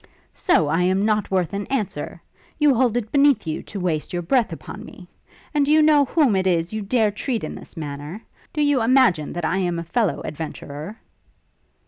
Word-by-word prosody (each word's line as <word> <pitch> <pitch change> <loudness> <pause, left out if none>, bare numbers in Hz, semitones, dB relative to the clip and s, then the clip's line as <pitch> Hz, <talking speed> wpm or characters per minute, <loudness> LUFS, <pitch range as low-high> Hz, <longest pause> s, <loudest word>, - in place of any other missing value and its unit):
'So 175 - +2
I 165 +4 +1
am 190 +3 +2
not 215 -2 +1
worth 185 -1 0
an 200 0 -3
answer? 200 - -3 0.4
You 295 -2 +4
hold 245 -1 +2
it 220 -3 -3
beneath 280 -7 +4
you 155 -1 -3
to 200 - -7
waste 165 -4 -2
your 175 0 -2
breath 245 +5 +2
upon - - -8
me? - - -12 0.5
And 295 -1 +3
do 285 - +1
you 310 - +6
know 300 -2 +5
whom 270 -5 +2
it 190 0 +1
is 170 +1 0
you 215 - -2
dare 215 +1 +1
treat 230 +3 -3
in - - -4
this - - -12
manner? 150 +6 -6 0.3
Do 300 - 0
you 290 -3 +3
imagine 230 - +3
that 175 -1 -3
I 190 - 0
am 175 -3 0
a 170 - -3
fellow 210 +4 0
adventurer?' 155 +4 -7
205 Hz, 200 wpm, -22 LUFS, 170-255 Hz, 0.5 s, you